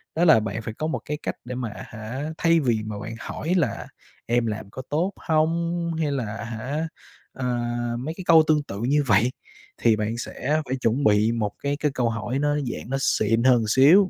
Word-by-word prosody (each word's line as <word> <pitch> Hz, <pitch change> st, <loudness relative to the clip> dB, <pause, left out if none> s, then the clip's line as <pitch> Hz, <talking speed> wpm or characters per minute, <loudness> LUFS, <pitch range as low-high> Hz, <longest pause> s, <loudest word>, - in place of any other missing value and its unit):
đó 170 Hz, +2 st, +3 dB
là 155 Hz, -9 st, +7 dB
bạn 110 Hz, +1 st, -3 dB
phải 110 Hz, 0 st, -5 dB
có 155 Hz, -, -3 dB
một 160 Hz, -, -2 dB
cái 150 Hz, -, -3 dB
cách -, -, -2 dB
để 125 Hz, 0 st, -5 dB
mà 125 Hz, -3 st, -3 dB
à 105 Hz, -, -9 dB
hả, 125 Hz, +6 st, -5 dB
thay 165 Hz, 0 st, +4 dB
vì 120 Hz, -7 st, +1 dB
mà 105 Hz, -1 st, -5 dB
bạn 110 Hz, -, -6 dB
hỏi 165 Hz, +8 st, -3 dB
là 140 Hz, -, -1 dB, 0.4 s
"Em 120 Hz, 0 st, +1 dB
làm 110 Hz, -2 st, -4 dB
có 130 Hz, -, -7 dB
tốt 175 Hz, +7 st, 0 dB
hông?" 170 Hz, +1 st, 0 dB
Hay 150 Hz, -2 st, +1 dB
là 115 Hz, -6 st, -2 dB
à -, -, -5 dB
hả, 125 Hz, +8 st, -3 dB, 0.5 s
ờ, 130 Hz, -, -4 dB, 0.5 s
mấy 155 Hz, +6 st, -4 dB
cái 185 Hz, -, -6 dB
câu 165 Hz, -1 st, +8 dB
tương 150 Hz, -2 st, +3 dB
tự 100 Hz, -7 st, -7 dB
như 145 Hz, +4 st, +2 dB
vậy, 110 Hz, +3 st, +4 dB, 0.5 s
thì 115 Hz, -, +4 dB
bạn 110 Hz, +2 st, -2 dB
sẽ 150 Hz, +5 st, -1 dB
phải 130 Hz, -, -2 dB
chuẩn 125 Hz, +2 st, 0 dB
bị 105 Hz, +2 st, +4 dB
một 110 Hz, -3 st, -1 dB
cái 140 Hz, 0 st, 0 dB
cái 150 Hz, -1 st, +1 dB
câu 125 Hz, -3 st, 0 dB
hỏi 115 Hz, +3 st, -2 dB
nó, 145 Hz, 0 st, +1 dB
dạng, 130 Hz, -5 st, -4 dB
nó 135 Hz, -, 0 dB
xịn 115 Hz, -2 st, +2 dB
hơn 130 Hz, 0 st, +7 dB
một 115 Hz, -, +1 dB
xíu, 155 Hz, -, +6 dB
130 Hz, 225 wpm, -24 LUFS, 110-155 Hz, 0.5 s, câu